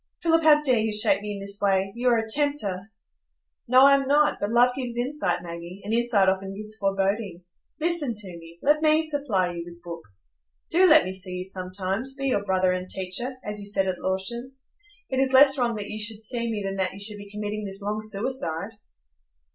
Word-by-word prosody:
"Philip, 330 -1 +3
how 300 -1 +5
dare 255 -5 +3
you 220 0 0
shake 200 -1 +5
me 210 0 -5
in 200 - -6
this 200 +1 -1
way? 195 -1 +1
You 245 +1 -2
are 235 - +4
a 225 0 -2
tempter." 220 -7 0 0.8
"No, 255 +2 +7
I 280 - +7
am 275 -1 +2
not; 295 +2 +3
but 205 - -2
love 240 +2 +4
gives 245 -3 -4
insight, 240 -9 -1
Maggie, 170 +2 -8
and 210 +2 -3
insight 230 -4 +2
often 195 +1 -1
gives 215 +1 -5
foreboding. 195 -2 -1 0.4
Listen 315 -7 0
to 210 -2 -3
me,—let 170 - 0
me 310 0 +3
supply 260 - 0
you 170 0 -5
with 170 0 -13
books; 130 - -9 0.4
do 365 +2 +5
let 310 0 +6
me 185 - -4
see 185 -1 -4
you 180 0 -5
sometimes,—be 190 +8 -3
your 205 -6 0
brother 185 -2 +1
and 185 0 -3
teacher, 190 +8 -3
as 210 0 -3
you 200 - 0
said 195 -1 +1
at 185 -1 -2
Lorton. 235 +8 -3 0.6
It 260 - 0
is 265 0 +1
less 275 +1 +7
wrong 240 -2 +1
that 205 -1 -5
you 215 - -5
should 220 0 -3
see 235 +1 -2
me 210 -2 -3
than 195 0 -4
that 190 -1 -1
you 195 - -10
should 205 0 -4
be 205 0 -11
committing 210 0 -5
this 195 0 -3
long 210 +1 -2
suicide." 210 -2 -3
210 Hz, 210 wpm, -25 LUFS, 190-255 Hz, 0.8 s, No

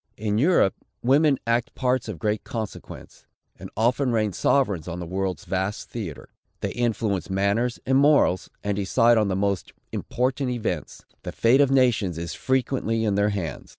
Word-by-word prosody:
In 105 0 -1
Europe, 150 - +4 0.3
women 140 +3 +4
act 115 +3 0
parts 130 -2 0
of 105 -6 -5
great 105 +3 -1
consequence, 110 -3 -8 0.3
and - - -8
often 125 +4 +2
reign 110 -3 0
sovereigns 100 - +1
on 90 0 -5
the 90 - -5
world's 95 +1 -3
vast 95 +2 -3
theatre. 85 - -7 0.3
They - - -2
influence 110 -6 -1
manners 100 +5 0
and 130 +1 +3
morals, 140 -10 +3
and 100 0 -1
decide 115 +4 +3
on 105 - +1
the 95 - -1
most 100 -1 -1 0.2
important 130 +1 -1
events. 120 -3 -4 0.2
The - - -6
fate 125 +5 +4
of 140 - +4
nations 120 -10 +2
is 85 0 -4
frequently 125 -4 0
in 105 - +1
their 100 +1 +2
hands. 90 -8 -4
110 Hz, 165 wpm, -24 LUFS, 100-125 Hz, 0.3 s, Europe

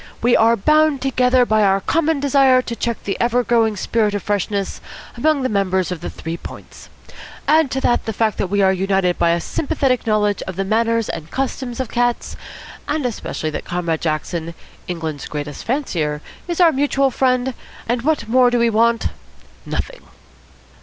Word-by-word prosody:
We 240 +1 +4
are 230 +1 +4
bound 305 +5 +3
together 255 -1 +2
by 215 -2 +2
our 195 -1 +3
common 320 - +1
desire 270 -2 +4
to 235 - -5
check 235 -1 -3
the 195 - -2
ever 245 +1 +2
growing 225 -3 +2
spirit 210 +1 0
of 205 - -3
freshness 200 -1 -2 0.3
among 285 +3 +1
the - - +2
members 190 -4 0
of 175 -3 -5
the - - -4
Three 165 +1 -6
Points. - - -11 0.6
Add 315 -2 +4
to 265 - -2
that 240 - +1
the 220 - -2
fact 220 0 0
that - - 0
we 200 0 +2
are 190 0 +4
united 190 -1 0
by 170 - +3
a 170 0 +2
sympathetic 270 - -1
knowledge 210 -2 +1
of 190 - -5
the 195 - -1
manners 230 +2 +1
and 165 -1 -6
customs 260 0 -3
of 260 -3 -2
cats, 240 0 -1 0.5
and 295 -2 -1
especially 205 -9 -3
that - - -5
Comrade 170 -2 -2
Jackson, 165 +1 -3 0.3
England's 160 -5 -4
greatest 150 -1 -6
fancier, 165 - -2 0.2
is 345 0 -3
our 345 -2 +6
mutual 275 -1 +1
friend, 255 0 +1 0.3
and 240 +1 0
what 295 -3 0
more 250 +2 +4
do 245 - +1
we 235 -1 +2
want? 230 +1 +2 0.6
Nothing." - - -4
230 Hz, 180 wpm, -19 LUFS, 190-260 Hz, 0.6 s, our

